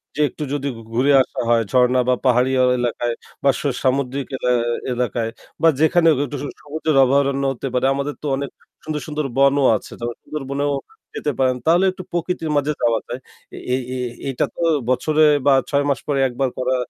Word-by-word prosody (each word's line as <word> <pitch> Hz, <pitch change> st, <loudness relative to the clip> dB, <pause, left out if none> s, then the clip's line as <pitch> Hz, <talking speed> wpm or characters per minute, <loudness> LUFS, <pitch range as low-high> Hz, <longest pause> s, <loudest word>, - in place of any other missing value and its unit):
যেয়ে 150 Hz, 0 st, +2 dB
একটু 150 Hz, -, -7 dB
যদি 140 Hz, -1 st, -2 dB, 0.3 s
ঘুরে 130 Hz, +5 st, +3 dB
আসা -, -, -4 dB
হয় 115 Hz, -1 st, +4 dB
ঝর্ণা 125 Hz, 0 st, +4 dB
বা 125 Hz, -, +4 dB
পাহাড়ি 125 Hz, +1 st, +3 dB
অ -, -, +5 dB
এলাকায় 120 Hz, 0 st, -1 dB, 0.3 s
বা 140 Hz, -, +4 dB
সু -, -, -2 dB, 0.2 s
সামুদ্রিক 135 Hz, 0 st, 0 dB
এলা 125 Hz, -, 0 dB, 0.4 s
এলাকায় 120 Hz, -2 st, -1 dB, 0.3 s
বা 165 Hz, -, +5 dB
যেখানে 165 Hz, +2 st, +4 dB
হোক 140 Hz, -, +1 dB
একটু 145 Hz, +1 st, -6 dB
স -, -, -3 dB, 0.2 s
সবুজের 155 Hz, +1 st, -2 dB
অভয়ারণ্য 140 Hz, +1 st, +2 dB
হতে 135 Hz, -, -5 dB
পারে। 125 Hz, +1 st, +1 dB
আমাদের 140 Hz, +1 st, -3 dB
তো -, -, -2 dB
অনেক 140 Hz, 0 st, -4 dB, 0.3 s
সুন্দর, 155 Hz, -1 st, -3 dB
সুন্দর 150 Hz, -1 st, -3 dB
বনও 140 Hz, 0 st, +4 dB
আছে। -, -, -13 dB
তাহলে 120 Hz, 0 st, -4 dB
সুন্দরবনেও 145 Hz, 0 st, -3 dB, 0.4 s
যেতে 150 Hz, -, -1 dB
পারেন। 130 Hz, -1 st, +3 dB
তাহলে 175 Hz, +4 st, +4 dB
একটু 185 Hz, 0 st, -9 dB
প্রকৃতির 170 Hz, -1 st, -2 dB
মাঝে 145 Hz, +1 st, +1 dB
যাওয়া 115 Hz, -1 st, +2 dB
যায়। 125 Hz, +2 st, -5 dB, 0.6 s
এই 130 Hz, -, -1 dB, 0.2 s
এই, 125 Hz, -, -2 dB, 0.2 s
এটা 135 Hz, -, 0 dB
তো -, -, -6 dB, 0.3 s
বছরে 150 Hz, +5 st, +2 dB, 0.2 s
বা 140 Hz, -, +6 dB, 0.2 s
৬ 140 Hz, 0 st, +1 dB
মাস 135 Hz, -4 st, +1 dB
পরে 145 Hz, -2 st, 0 dB
১ 125 Hz, -, -8 dB
বার 135 Hz, -1 st, +2 dB
করা 130 Hz, 0 st, 0 dB
140 Hz, 190 wpm, -20 LUFS, 125-150 Hz, 0.6 s, বা